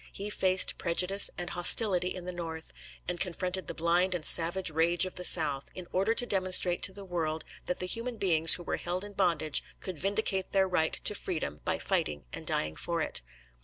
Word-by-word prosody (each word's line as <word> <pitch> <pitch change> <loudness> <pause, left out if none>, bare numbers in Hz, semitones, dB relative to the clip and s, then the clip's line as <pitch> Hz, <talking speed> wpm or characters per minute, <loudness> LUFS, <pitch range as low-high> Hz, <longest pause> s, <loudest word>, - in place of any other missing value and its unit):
He 205 +1 -7
faced 185 -2 +3
prejudice 185 +4 +4
and 175 -1 -5
hostility 180 +1 +3
in 185 -1 -7
the 180 - -1
North, 165 -2 -8 0.3
and 175 0 -4
confronted 185 0 -3
the - - -5
blind 175 +3 0
and 165 - -3
savage 170 +1 +3
rage 170 +3 +2
of 185 - -7
the 180 - -8
South, 145 -6 +3
in 185 - -8
order 200 +5 0
to 245 - -2
demonstrate 185 -4 +1
to - - 0
the 200 +1 -10
world 160 -3 -4 0.2
that 180 - -2
the 180 - -4
human 230 +5 -3
beings 165 -5 +6
who 175 - -9
were - - -4
held 180 +2 -5
in 205 0 -10
bondage 165 -6 +1 0.2
could 185 -5 -8
vindicate 195 0 -2
their 190 -1 +2
right 160 -4 -1
to - - +3
freedom 155 - -5
by - - -1
fighting 75 -3 -3
and - - -9
dying 75 0 -2
for 170 - -4
it. 110 - +1
180 Hz, 200 wpm, -28 LUFS, 165-190 Hz, 0.3 s, beings